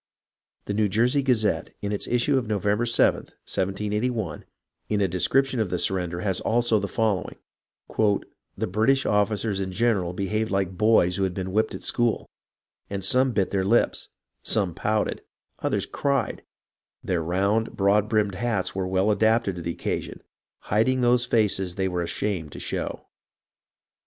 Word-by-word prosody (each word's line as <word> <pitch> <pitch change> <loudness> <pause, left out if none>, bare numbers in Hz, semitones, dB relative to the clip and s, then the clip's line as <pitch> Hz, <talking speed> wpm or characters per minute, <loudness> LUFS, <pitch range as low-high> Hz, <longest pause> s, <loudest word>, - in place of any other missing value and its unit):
The 100 - -3
Neiv 105 0 +1
Jersey 120 +7 +2
Gazette, 115 -6 0
in 100 - -2
its 105 - -2
issue 125 +4 +2
of 130 -4 0
November 105 +2 0
7th, 115 - +4
1 - - -24
78 105 +4 -1
1, 115 -5 -4 0.4
in 105 - +1
a 100 - +2
description 125 +9 +1
of 110 -4 0
the 90 - -1
surrender 90 -1 -1
has 95 -3 -1
also 115 -1 +2
the 100 - -3
following: 105 -4 -1 0.6
"The 105 -2 -1
British 115 +8 +2
officers 105 0 +1
in 95 -1 -3
general 95 -4 +1
behaved 105 +4 -1
like 95 -1 -1
boys 90 -4 +3
who 100 - 0
have 95 -2 -1
been 95 -1 -4
whipped 110 +3 +1
at - - -8
school; 120 -2 0 0.7
some 125 +7 +2
bit 100 -4 0
their 95 -1 +1
lips, 115 +5 +1 0.3
some 100 -6 +1
pouted, 105 +5 -1 0.4
others - - -1
cried; 140 -4 -1 0.6
their 90 -3 0
round, 100 +7 0
broad 105 +2 +3
brimmed 105 -3 +1
hats 105 -1 -1
were 95 -1 -2
well 95 +3 +2
adapted 110 -3 +2
to - - -5
the 85 0 -3
occasion, - - -4 0.4
hiding 120 +5 +1
those 120 0 +3
faces 95 -6 +1
they 95 -1 0
were 90 -1 -2
ashamed 85 -2 -3
to - - -8
show. - - -4
105 Hz, 160 wpm, -25 LUFS, 95-115 Hz, 0.7 s, 7th